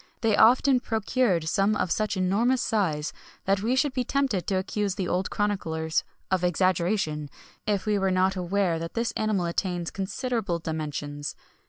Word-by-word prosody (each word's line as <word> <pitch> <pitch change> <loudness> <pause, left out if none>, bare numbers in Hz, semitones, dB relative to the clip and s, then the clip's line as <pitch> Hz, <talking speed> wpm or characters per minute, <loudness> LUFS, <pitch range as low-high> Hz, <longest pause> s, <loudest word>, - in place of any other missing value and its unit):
[XXI - - -34
73] 225 -2 +2
They 205 - +3
often 255 +3 +5
procured 220 -7 0
some 195 +5 +2
of 180 - -1
such 210 -2 0
enormous 225 +8 +2
size, 165 -10 0 0.3
that 195 0 +2
we 235 +5 +1
should 275 0 +1
be 255 - 0
tempted 250 - 0
to 195 - +1
accuse 195 +1 -1
the 190 -3 -2
old 185 +2 0
chroniclers 160 -6 -1 0.3
of 185 -1 +1
exaggeration, 175 -3 +1 0.4
if 205 -1 0
we 210 -1 +1
were 195 0 +1
not 185 +1 +2
aware 180 -2 0
that 165 +1 -6
this 230 0 0
animal 215 -5 0
attains 175 0 -2
considerable 200 -1 -2
dimensions. 150 -3 -4
195 Hz, 170 wpm, -26 LUFS, 170-215 Hz, 0.4 s, often